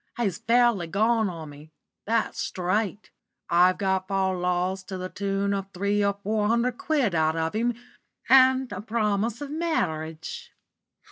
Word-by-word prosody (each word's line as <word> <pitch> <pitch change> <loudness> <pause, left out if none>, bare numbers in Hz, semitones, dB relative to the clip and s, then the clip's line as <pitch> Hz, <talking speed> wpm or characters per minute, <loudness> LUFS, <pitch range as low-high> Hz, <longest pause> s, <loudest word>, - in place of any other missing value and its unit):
He's 205 -8 -1
fairly 235 -6 +3
gone 220 +4 +2
on 160 -4 -8
me 145 +2 -14 0.4
that's 230 0 0
straight. 200 +3 -2 0.4
I've 180 +2 +5
got 190 -1 0
fal 190 -1 0
lals 180 +1 -1
to 190 - -5
the 185 0 -5
tune 200 0 -1
of 195 -1 -3
three 200 +2 +1
or 200 0 +1
four 210 0 0
hundred 235 +2 +1
quid 280 - +1
out 160 -1 +2
of 160 0 -1
him, 235 +2 0 0.5
and 260 -1 +5
a 190 -1 -5
promise 215 +1 -1
of 290 -1 -5
marriage." 160 - -3
200 Hz, 150 wpm, -26 LUFS, 180-230 Hz, 0.5 s, I've